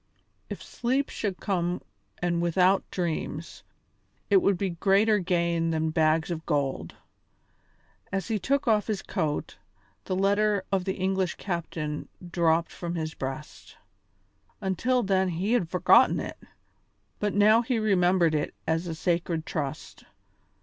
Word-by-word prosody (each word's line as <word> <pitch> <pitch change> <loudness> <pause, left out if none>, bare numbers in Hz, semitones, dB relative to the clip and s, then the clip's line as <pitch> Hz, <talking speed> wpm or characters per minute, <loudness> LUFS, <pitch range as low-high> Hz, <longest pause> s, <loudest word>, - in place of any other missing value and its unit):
If - - -6
sleep 260 +4 -1
should 200 -4 -3
come 180 -3 -1 0.4
and 170 -1 +1
without 180 +3 +2
dreams, 170 -2 -4 0.7
it - - +7
would 200 - +3
be 190 0 -1
greater 200 +5 +3
gain 170 -2 0
than 160 -1 0
bags 160 +1 +2
of 160 -1 -4
gold. 140 -4 -1 1.2
As 195 0 -2
he 220 -2 0
took 275 +8 0
off 215 -2 +3
his 210 -3 -2
coat, 155 -5 -2 0.5
the 185 - -1
letter 200 +1 +2
of 190 -2 +1
the 190 - -1
English 190 -1 0
captain 165 -5 -4 0.2
dropped 165 -1 +2
from 175 0 -5
his 160 -1 -3
breast. 135 +3 -7 0.8
Until 230 +6 0
then 190 -1 +2
he 185 +6 -1
had 200 -10 +1
forgotten 180 0 +5
it, - - -6 0.8
but 205 -1 -1
now 215 +3 +6
he 245 0 -1
remembered 180 -5 +3
it 150 -1 -1
as 165 +2 0
a 165 - -3
sacred 170 -1 -1
trust. 140 -4 -5
180 Hz, 135 wpm, -27 LUFS, 165-200 Hz, 1.2 s, it